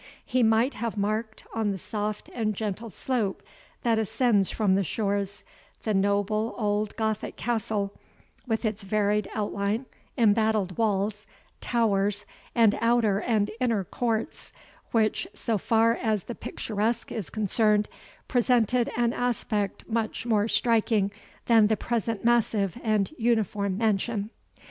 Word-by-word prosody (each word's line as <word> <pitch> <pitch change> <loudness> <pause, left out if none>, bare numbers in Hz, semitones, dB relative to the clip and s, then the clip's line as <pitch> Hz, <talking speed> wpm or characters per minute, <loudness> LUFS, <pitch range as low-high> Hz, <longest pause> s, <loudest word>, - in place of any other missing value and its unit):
He 255 - +1
might 225 +4 +3
have 230 -2 -4
marked, 215 +2 -2
on 220 -2 0
the 195 - -2
soft 210 +2 -4
and 215 -3 -1
gentle 215 +2 -3
slope 220 -3 -2 0.4
that 230 -2 +3
ascends 220 -2 +2
from 205 -4 +1
the 195 +1 +2
shores, 200 +1 -2 0.4
the 215 - 0
noble 205 +3 +1
old 210 -1 0
Gothic 220 -1 -2
castle, 215 -4 -1 0.5
with 225 0 -1
its 215 0 -1
varied 205 0 0
outline, 205 +3 -1 0.3
embattled 215 -4 +2
walls, 210 -1 0 0.3
towers, 205 -3 +1 0.3
and 225 -3 +4
outer 230 -4 +3
and 215 -4 +1
inner 230 -6 +1
courts, 225 +4 -3 0.4
which, 220 -2 +1
so 225 -3 0
far 225 +3 +3
as 215 -5 -1
the 240 - -6
picturesque 220 +1 -2
is 215 -6 -4
concerned, 210 0 +2 0.4
presented 245 -1 +2
an 240 0 +2
aspect 215 -4 -2
much 225 0 -2
more 215 -3 +2
striking 220 -4 +2 0.3
than 225 -3 +6
the 220 0 +1
present 230 -2 -2
massive 220 -5 +2
and 215 +2 +1
uniform 210 -4 +1
mansion. 215 0 0
215 Hz, 130 wpm, -27 LUFS, 205-230 Hz, 0.5 s, than